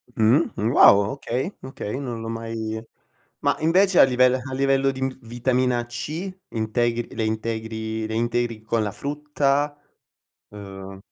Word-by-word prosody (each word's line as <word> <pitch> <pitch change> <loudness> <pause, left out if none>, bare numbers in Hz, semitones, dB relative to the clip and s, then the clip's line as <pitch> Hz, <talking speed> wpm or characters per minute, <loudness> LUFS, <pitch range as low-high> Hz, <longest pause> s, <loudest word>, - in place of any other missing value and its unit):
Mh, 120 +9 +3
wow, 100 -2 +5
okay, 135 - -3
okay 130 -5 -6
non 120 -4 -5
l'ho 115 - -6
mai 115 -1 -4 0.6
ma - - +1
invece 180 +4 +3
a - - +10
livell 125 0 +4
a 130 +1 -4
livello 135 0 +2
di 130 0 -7
m 130 0 -2
vitamina 120 +1 0
C, 155 +10 -5 0.2
integri 115 +1 -1
le 110 - -1
integri 110 0 -3
le 110 - -4
integri 120 -1 -1
con 110 0 0
la 100 - -3
frutta? 145 +1 -1 0.7
Uhm 95 -1 -9
120 Hz, 140 wpm, -23 LUFS, 110-135 Hz, 0.7 s, a